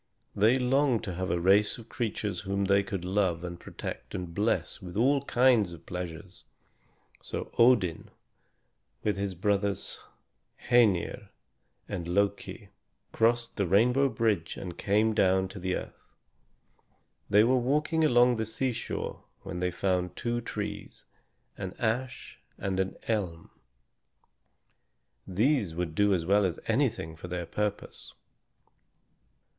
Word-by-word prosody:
They 110 +6 +4
longed 130 -1 +2
to 95 - -4
have 95 +1 -3
a 85 - +1
race 100 +4 +4
of 115 -2 -12
creatures 105 -5 -3
whom 100 0 -1
they 100 +1 +4
could 95 -2 -5
love 95 -3 0
and 85 -1 -6
protect - - -7
and 90 -2 -5
bless 105 +4 -1
with 90 0 -7
all 135 +4 +3
kinds 120 -9 +3
of 85 - -13
pleasures. 90 +1 -7 0.8
So - - -5
Odin, 115 -9 +4 0.9
with 105 -2 +1
his 100 -1 -2
brothers 100 +1 -1 0.7
Hœnir 110 -8 +3 0.6
and 85 -4 -4
Loki, 100 +3 -1 0.4
crossed 115 +1 +1
the 100 -3 +1
rainbow 125 +9 +4
bridge 110 -10 0
and 90 -3 -6
came 105 +2 +2
down 95 -2 +3
to 95 - -9
the 95 0 -1
earth. - - -7 1.3
They 105 +1 +6
were 125 +2 +3
walking 150 +6 +1
along 125 -4 +5
the 110 - -1
seashore 120 +2 -3 0.2
when 90 - -5
they 90 0 0
found 90 0 -1
two 120 0 -2
trees, 115 - -6 0.6
an 95 -2 -5
ash 120 +3 -3 0.2
and 95 -1 -2
an 95 0 -1
elm. 90 -7 -2 1.8
These 105 - +1
would 85 -2 -3
do 100 +4 +3
as 85 -2 -2
well 100 +3 +4
as 90 -3 -1
anything 80 0 0
for 80 +3 -9
their 90 -1 -4
purpose. 105 +4 -4
100 Hz, 130 wpm, -29 LUFS, 90-115 Hz, 1.8 s, They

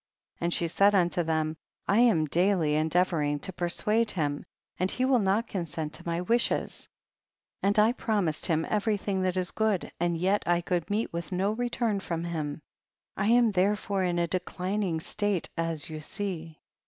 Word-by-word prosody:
And 170 0 0
she 170 - +1
said 200 +5 +4
unto 175 -1 +2
them, 160 -1 -1 0.3
I 200 +3 +3
am 220 -10 +4
daily 170 0 +2
endeavoring 155 -1 +1
to 190 - -4
persuade 210 +6 +1
him, 145 -5 -1 0.4
and 185 +1 +1
he 255 - 0
will 260 -2 +4
not 205 +3 +1
consent 165 -5 -4
to - - -8
my 170 +1 -1
wishes, 235 +6 0 0.7
and 200 +2 +2
I 215 +2 +5
promised 205 -10 -1
him 160 -1 +1
every 210 0 +1
thing 195 -1 -2
that 185 0 0
is 180 -1 -1
good, 215 -4 0
and 170 0 +1
yet 190 +4 +2
I 175 0 +3
could 175 -1 -2
meet* 210 0 -1
with 170 +3 -5
no 190 +3 +1
return 235 -2 -1
from 170 -3 -3
him; 155 -3 -4 0.5
I 195 - 0
am 235 0 +5
therefore 200 0 +1
in 175 -1 0
a 170 - +2
declining 185 0 -2
state 205 +1 -1
as 165 -2 -1
you 155 -1 -6
see. 165 -2 -5
180 Hz, 175 wpm, -28 LUFS, 165-205 Hz, 0.7 s, I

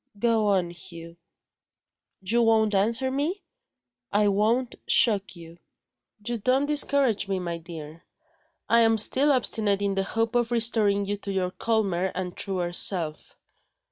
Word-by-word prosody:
"Go 225 -1 +1
on, 185 -4 +1
Hugh." 170 -1 -11 1.1
"You 230 +5 0
won't 220 -2 +2
answer 230 +7 +2
me?" 305 +9 -3 0.7
"I 205 0 +2
won't 225 +5 0
shock 205 -5 +3
you." 170 0 -14 0.7
"You 240 0 -3
don't 255 +6 +1
discourage 280 -7 +1
me, 195 -1 -2
my 170 -2 -5
dear; 160 -1 -10 0.7
I 230 - +4
am 225 -1 +3
still 270 +7 +3
obstinate 215 -6 0
in 200 -1 0
the 195 - -1
hope 225 +3 -2
of 240 -1 0
restoring 220 -4 +1
you 205 +1 -3
to 200 0 -7
your 185 -2 -2
calmer 190 -5 -1
and 180 -1 -5
truer 180 -3 -3
self. 170 -3 -1
205 Hz, 140 wpm, -25 LUFS, 185-230 Hz, 1.1 s, I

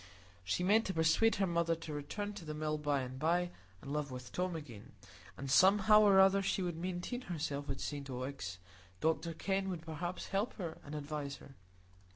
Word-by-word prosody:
She 95 - 0
meant 215 +5 +4
to 190 - -3
persuade 165 +8 +4
her 195 - +2
mother 170 -1 +1
to 160 -1 -7
return 205 +8 -4
to 200 -3 -8
the 155 -1 -5
Mill 155 0 -1
by 145 -2 +1
and 130 0 -6
by, 175 +3 +1 0.3
and 140 - -5
live 150 -1 -1
with 125 -1 -8
Tom 180 -1 -1
again; 125 -10 -9 0.4
and 135 - -5
somehow 205 +9 +6
or 200 -2 +6
other 195 +1 +6
she 195 0 0
would 175 -2 -2
maintain 180 +8 -3
herself 150 - -3
at 135 - -3
St 145 -2 -4
Ogg's. 125 -8 -4 0.4
Dr 160 +1 0
Kenn 195 +2 -1
would 175 -3 -4
perhaps 170 +2 -5
help 200 +4 0
her 170 -6 -5
and 150 +1 -7
advise 145 -1 -4
her. 135 - -14
165 Hz, 195 wpm, -35 LUFS, 145-190 Hz, 0.4 s, somehow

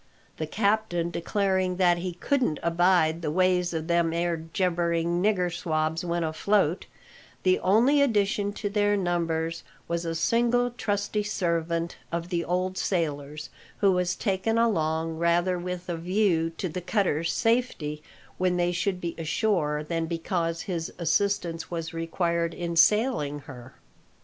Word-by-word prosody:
The 155 - -3
captain 200 -3 0
declaring 190 0 0
that 175 -2 +3
he 180 0 -3
"couldn't 245 - 0
abide 170 -1 +3
the 155 - -2
ways 180 +1 +2
o' 165 - -1
them 170 0 +1
'ere 170 0 0
jabbering 170 0 0
nigger 180 -4 +1
swabs 160 0 -1
when 170 -1 -1
afloat," 175 +2 +1 0.6
the 185 0 +3
only 240 +10 +4
addition 205 -5 +1
to 210 - -4
their 205 0 +2
numbers 165 -3 -1 0.3
was 170 0 -2
a 165 -1 -3
single 240 +6 +2
trusty 210 -3 -1
servant 170 -4 -1
of 170 0 -3
the 170 -2 -1
old 185 +2 -1
sailor's, 150 -4 -2 0.3
who 200 -2 +4
was 180 0 +1
taken 210 +2 0
along 160 -7 +1
rather 175 +2 +2
with 180 0 -5
a 175 -2 -2
view 175 -1 +1
to 185 - -2
the 180 +2 -5
cutter's 170 -4 0
safety 225 -11 0 0.4
when 180 -1 +2
they 175 0 +1
should 185 +1 -1
be 170 -2 -3
ashore 160 -3 0
than 165 +1 -2
because 165 0 -2
his 170 -4 -3
assistance 170 0 0
was 165 -2 -4
required 170 0 -1
in 170 -1 -3
sailing 190 - +3
her. 130 -2 -12
175 Hz, 145 wpm, -27 LUFS, 165-195 Hz, 0.6 s, only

